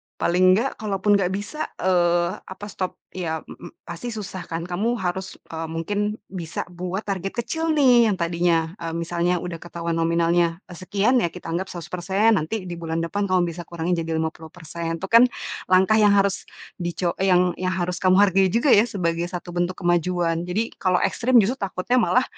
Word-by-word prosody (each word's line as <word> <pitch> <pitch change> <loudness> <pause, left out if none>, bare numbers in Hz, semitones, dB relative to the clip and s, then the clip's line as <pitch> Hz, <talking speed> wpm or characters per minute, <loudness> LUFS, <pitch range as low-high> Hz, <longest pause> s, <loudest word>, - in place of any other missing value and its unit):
paling 185 +2 +4
nggak 240 +7 -1
kalaupun 205 -1 +1
nggak 185 - +1
bisa, 210 +11 -4
eee, 175 -2 +3 0.2
apa 190 +2 -9
stop 185 -1 -4 0.2
ya, 160 -4 -4
m - - -10
m - - -10 0.2
pasti 170 +7 -6
susah 195 -4 -6
kan. 165 0 -4
Kamu 195 +7 -1
harus, 190 -2 -3 0.2
eee, 165 0 -4
mungkin 205 +6 -2 0.2
bisa 170 -4 -4
buat 180 +3 -4
target 195 -1 -4
kecil 325 +4 -1
nih 250 -5 +6
yang 205 - +1
tadinya, 170 -2 +1
eee, 165 -1 -4
misalnya 170 +1 0
udah 170 -2 -5
ketahuan 170 0 -4
nominalnya 170 +1 +1
sekian 200 +8 +1
ya, 200 - +1
kita 170 0 -8
anggap 180 +3 -2
100%, 180 +4 0
nanti 185 +7 -3
di 175 -2 -7
bulan 165 0 -2
depan 200 +4 -1
kamu 185 -1 +2
bisa 170 +1 -9
kurangi 170 +1 -3
jadi 160 0 -3
50%. 160 +1 -4
Itu - - -2
kan 230 +2 +8 0.4
langkah 190 +4 +4
yang 205 -1 +5
harus 200 -1 +1 0.3
dico 175 0 -1
yang 180 -1 +3
yang 185 0 -1
harus 180 -1 -2
kamu 185 -1 +4
hargai 195 -1 +4
juga 235 +9 +2
ya 215 +4 +6
sebagai 170 -4 -1
satu 175 0 -7
bentuk 175 +1 -1
kemajuan. 175 -1 +1
Jadi, 210 +6 -1
kalau 185 -2 +2
ekstrim 250 +1 +1
justru 250 +7 -1
takutnya 195 +5 0
malah 250 +2 +3
180 Hz, 180 wpm, -23 LUFS, 170-200 Hz, 0.4 s, kan